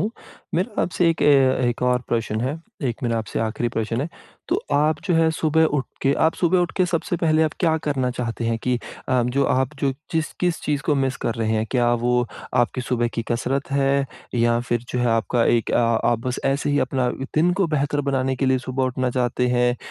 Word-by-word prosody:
हूँ। 210 Hz, -, 0 dB, 0.4 s
मेरा 190 Hz, +6 st, 0 dB
आपसे 175 Hz, -1 st, +1 dB
एक 160 Hz, -, -2 dB
ए 135 Hz, -3 st, +4 dB
एक 120 Hz, -, -3 dB
और 125 Hz, 0 st, +2 dB
प्रश्न 115 Hz, -2 st, -1 dB
है। 135 Hz, +6 st, -2 dB, 0.3 s
एक 120 Hz, +2 st, -5 dB
मेरा 115 Hz, -1 st, 0 dB
आपसे 110 Hz, -, -4 dB
आखिरी 115 Hz, +2 st, -1 dB
प्रश्न 115 Hz, +1 st, -2 dB
है। 150 Hz, -, -2 dB, 0.4 s
तो -, -, +1 dB
आप 150 Hz, +1 st, +2 dB
जो 180 Hz, -4 st, +1 dB
है 165 Hz, 0 st, +4 dB
सुबह 160 Hz, 0 st, +2 dB
उठके 140 Hz, -2 st, -1 dB
आप 160 Hz, -, +1 dB
सुबह 180 Hz, +1 st, +2 dB
उठके 180 Hz, +1 st, +1 dB
सबसे 170 Hz, 0 st, -1 dB
पहले 160 Hz, -1 st, +2 dB
आप 155 Hz, -, +1 dB
क्या 160 Hz, -3 st, +3 dB
करना 130 Hz, -3 st, 0 dB
चाहते 120 Hz, -1 st, -4 dB
हैं? 115 Hz, 0 st, 0 dB
कि 125 Hz, +1 st, 0 dB, 0.3 s
अ, 130 Hz, -2 st, +3 dB
जो 130 Hz, +3 st, +1 dB
आप 130 Hz, +3 st, +1 dB
जो 135 Hz, -1 st, +1 dB, 0.2 s
जिस 160 Hz, -1 st, -1 dB
किस 175 Hz, -2 st, 0 dB
चीज़ 145 Hz, -1 st, -1 dB
को 150 Hz, -, +1 dB
मिस 135 Hz, -2 st, 0 dB
कर 115 Hz, -, 0 dB
रहे 110 Hz, -1 st, -1 dB
हैं? 110 Hz, 0 st, +1 dB
क्या 120 Hz, -2 st, +2 dB
वो 120 Hz, +1 st, +1 dB, 0.3 s
आपकी 120 Hz, +1 st, +1 dB
सुबह 120 Hz, -2 st, 0 dB
की 115 Hz, -, -1 dB
कसरत 135 Hz, +4 st, -1 dB
है 140 Hz, 0 st, +2 dB, 0.3 s
या 120 Hz, 0 st, +3 dB
फिर 120 Hz, -1 st, -1 dB
जो 125 Hz, -, -2 dB
है 120 Hz, -, +1 dB
आपका 115 Hz, +1 st, +1 dB
एक 115 Hz, -1 st, +2 dB
अ -, -, +2 dB, 0.3 s
आप 120 Hz, -, +1 dB
बस 125 Hz, -, -1 dB
ऐसे 140 Hz, +2 st, +1 dB
ही 145 Hz, -, +2 dB
अपना 130 Hz, -2 st, 0 dB, 0.3 s
दिन 170 Hz, +3 st, +3 dB
को 185 Hz, -, +4 dB
बेहतर 145 Hz, -1 st, 0 dB
बनाने 130 Hz, 0 st, 0 dB
के 135 Hz, -, 0 dB
लिए 130 Hz, 0 st, +3 dB
सुबह 130 Hz, +1 st, -2 dB
उठना 130 Hz, 0 st, -1 dB
चाहते 125 Hz, 0 st, 0 dB
हैं 125 Hz, 0 st, +2 dB
130 Hz, 220 wpm, -22 LUFS, 120-150 Hz, 0.4 s, ए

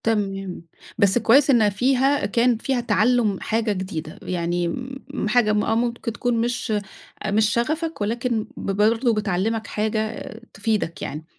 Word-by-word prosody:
تمام، 195 Hz, -5 st, -1 dB, 0.4 s
بس 200 Hz, 0 st, +4 dB
كويّس 245 Hz, +5 st, +5 dB
إنّها 230 Hz, -6 st, +5 dB
فيها 265 Hz, +5 st, +2 dB
كان 235 Hz, +3 st, +2 dB
فيها 260 Hz, +3 st, -1 dB
تعلُّم 220 Hz, -1 st, +2 dB
حاجة 225 Hz, 0 st, 0 dB
جديدة 185 Hz, -5 st, -5 dB
يعني 175 Hz, -1 st, -1 dB, 0.5 s
م 250 Hz, -, -2 dB
حاجة 215 Hz, -1 st, +3 dB
م 210 Hz, -, +2 dB
آه 225 Hz, -, +1 dB
ممكن 235 Hz, -1 st, -1 dB
تكون 245 Hz, +1 st, -1 dB
مش 240 Hz, -1 st, -1 dB, 0.5 s
أ -, -, 0 dB
مش 215 Hz, +1 st, +3 dB
شغفك 310 Hz, +6 st, -1 dB
ولكن 230 Hz, +1 st, -1 dB
ب -, -, -4 dB
برضو 225 Hz, +5 st, +2 dB
بتعلّمك 215 Hz, +2 st, -1 dB
حاجة 215 Hz, 0 st, -2 dB, 0.2 s
تفيدك 205 Hz, -5 st, -1 dB
يعني، 150 Hz, +3 st, -5 dB
220 Hz, 150 wpm, -23 LUFS, 200-240 Hz, 0.5 s, كويّس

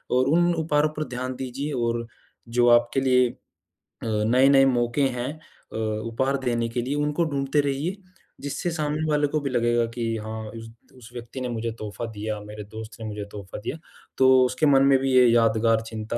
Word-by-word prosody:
और 130 Hz, +1 st, +3 dB
उन 175 Hz, +4 st, +3 dB
उपहारों 155 Hz, -1 st, +1 dB
पर 155 Hz, -, 0 dB
ध्यान 130 Hz, +1 st, -4 dB
दीजिए 135 Hz, +4 st, -4 dB
और 115 Hz, -1 st, -1 dB, 0.5 s
जो 120 Hz, 0 st, +4 dB
आपके 120 Hz, +2 st, +4 dB
लिए 125 Hz, -2 st, +4 dB
अ, -, -, -10 dB, 0.7 s
नए-नए 125 Hz, +6 st, +4 dB
मौके 120 Hz, 0 st, +1 dB, 0.2 s
हैं 125 Hz, +4 st, -2 dB, 0.4 s
अ, -, -, -4 dB
उपहार 115 Hz, +5 st, -1 dB
देने 120 Hz, -1 st, 0 dB
के 120 Hz, +1 st, -2 dB
लिए 140 Hz, +3 st, -2 dB
उनको 150 Hz, +3 st, 0 dB
ढूँढते 140 Hz, -1 st, 0 dB
रहिए। 145 Hz, +7 st, -2 dB, 0.4 s
जिससे 145 Hz, +5 st, -3 dB
सामने 155 Hz, -1 st, -2 dB
वाले 150 Hz, -1 st, +2 dB
को 155 Hz, +2 st, -1 dB
भी 140 Hz, -, -2 dB
लगेगा 120 Hz, -1 st, +2 dB
कि 120 Hz, -1 st, -4 dB, 0.2 s
हाँ 110 Hz, 0 st, -5 dB, 0.2 s
उस 115 Hz, 0 st, -9 dB, 0.3 s
उस 120 Hz, -1 st, -13 dB
व्यक्ति 120 Hz, +2 st, -7 dB
ने 125 Hz, -, -3 dB
मुझे 115 Hz, 0 st, -3 dB
तोहफ़ा 110 Hz, +2 st, -5 dB
दिया, 105 Hz, 0 st, -4 dB
मेरे 105 Hz, 0 st, -8 dB
दोस्त 110 Hz, +2 st, -9 dB
ने 110 Hz, -, -6 dB
मुझे 105 Hz, -1 st, -5 dB
तोहफ़ा 100 Hz, -1 st, -8 dB
दिया, 145 Hz, -, -4 dB, 0.4 s
तो 130 Hz, -1 st, +6 dB
उसके 130 Hz, +4 st, 0 dB
मन 135 Hz, -2 st, +5 dB
में 135 Hz, -1 st, +5 dB
भी 135 Hz, 0 st, 0 dB
ये 125 Hz, -1 st, +7 dB
यादगार 115 Hz, -1 st, +3 dB
चिंता 110 Hz, +1 st, -4 dB
125 Hz, 190 wpm, -25 LUFS, 115-140 Hz, 0.7 s, ये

